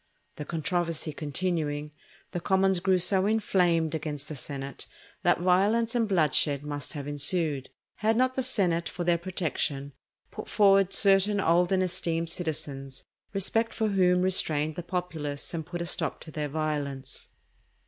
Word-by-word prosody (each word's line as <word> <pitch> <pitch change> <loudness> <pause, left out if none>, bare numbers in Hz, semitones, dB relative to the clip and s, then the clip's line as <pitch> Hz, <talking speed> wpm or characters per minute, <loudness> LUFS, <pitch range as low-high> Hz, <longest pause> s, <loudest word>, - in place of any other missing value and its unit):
The 150 - -5
controversy 165 -1 -2
continuing, 150 -1 -2 0.4
the 175 - -2
commons 190 0 +2
grew 185 +1 +3
so 190 +2 +2
inflamed 180 -7 +2
against 150 -2 -4
the 155 - -5
senate 140 0 -6 0.3
that - - +2
violence 205 +6 +3
and 235 -2 +1
bloodshed 150 -5 +3
must 145 +1 -5
have 145 -2 -6
ensued; 145 -1 -1 0.3
had 220 +2 +1
not 255 +1 +3
the 260 - -1
senate 180 -9 +1
for 175 - -4
their 170 -1 +2
protection 155 -6 -2 0.4
put - - -8
forward 195 -2 +4
certain 200 +1 +4
old 175 0 +3
and 190 -1 +3
esteemed 165 -2 -1
citizens, 140 -6 -4 0.3
respect 225 +4 0
for 220 -1 0
whom 180 -2 +3
restrained 155 -5 +2
the 175 - -4
populace 165 -6 -4
and 160 -2 -4
put 175 -1 -4
a - - -5
stop - - -1
to 160 - -10
their 150 -1 -3
violence. 140 -3 -3
170 Hz, 150 wpm, -28 LUFS, 150-190 Hz, 0.4 s, forward